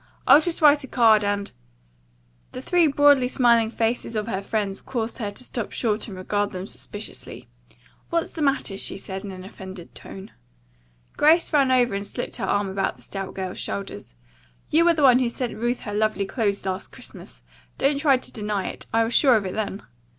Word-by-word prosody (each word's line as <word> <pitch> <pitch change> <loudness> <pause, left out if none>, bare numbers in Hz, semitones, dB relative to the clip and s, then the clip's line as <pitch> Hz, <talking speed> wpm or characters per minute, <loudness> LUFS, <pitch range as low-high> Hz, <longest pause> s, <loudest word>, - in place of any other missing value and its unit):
I'll 280 +4 +8
just 330 0 -3
write 290 -1 +6
a - - -7
card, 225 -4 +4
and 205 0 -1 0.5
" - - -38
The 255 - -6
three 350 0 +3
broadly 285 -2 +4
smiling 235 -3 +3
faces 230 0 -2
of 210 -1 -1
her 195 -4 -2
friends 200 -1 -2
caused 235 0 -4
her 210 -3 -2
to 205 +5 -8
stop 235 -3 -4
short 220 -1 -1
and 195 -4 -8
regard 205 +2 -1
them 185 -1 -6
suspiciously. 205 +1 -7 0.6
"What's 335 -1 -1
the 320 - -6
matter?" 275 -8 0
she - - +1
said 190 0 -6
in 205 - -6
an 185 -1 -8
offended 190 -3 -10
tone. 195 0 -10 0.9
Grace 320 +3 +4
ran 275 -3 +4
over 245 -3 +3
and 200 0 -2
slipped 245 - -5
her 210 - -2
arm 205 +1 0
about 195 0 -2
the - - -18
stout 195 -1 -6
girl's 185 -1 -5
shoulders. 195 - -6 0.6
"You 335 +3 +4
are 340 - +5
the 305 - 0
one 255 -2 +7
who 250 -2 +1
sent 245 0 -4
Ruth 240 +2 -2
her 205 - -6
lovely 215 -1 0
clothes 200 -3 -2
last 190 0 -3
Christmas. - - -10 0.3
Don't 280 0 +1
try 280 -3 +4
to 255 - -8
deny 210 -3 -2
it. - - -7
I 225 0 +3
was 225 +1 -2
sure 265 -4 +5
of 210 -3 0
it 185 - -4
then." 205 -1 -4
220 Hz, 200 wpm, -24 LUFS, 195-255 Hz, 0.9 s, I'll